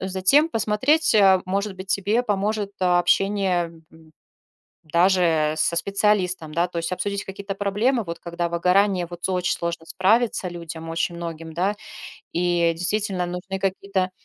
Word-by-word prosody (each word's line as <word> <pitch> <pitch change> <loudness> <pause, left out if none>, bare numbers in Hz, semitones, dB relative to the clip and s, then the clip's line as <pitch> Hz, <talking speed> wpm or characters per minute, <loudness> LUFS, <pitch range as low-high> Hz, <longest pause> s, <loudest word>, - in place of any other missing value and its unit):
затем 190 - +3
посмотреть, 260 +7 +2
э, 190 -3 +5
может 200 +1 -2
быть, 190 +1 -9
тебе 200 +5 +1
поможет 210 -1 -1
общение, 185 0 +2 0.2
м, 160 -1 -19 0.7
даже 170 -2 +2
со 170 - +1
специалистом, 185 -3 0
да? 170 +1 +2
То 175 - -8
есть 165 +1 -3
обсудить 200 +2 -2
какие-то 195 +1 -6
проблемы, 210 +5 0
вот 170 -3 -6
когда 170 0 -3
выгорание, 180 +2 +2
вот 175 0 -10
с - - 0
очень 180 -1 0
сложно 170 -1 -4
справиться 210 +2 +1
людям 165 -1 -8
очень 165 +1 -2
многим, 165 -1 -7
да? 190 +5 0 0.6
И 175 -1 +1
действительно, 185 +1 0
нужны 180 +2 -5
какие-то, 195 0 -1
185 Hz, 145 wpm, -23 LUFS, 170-200 Hz, 0.7 s, э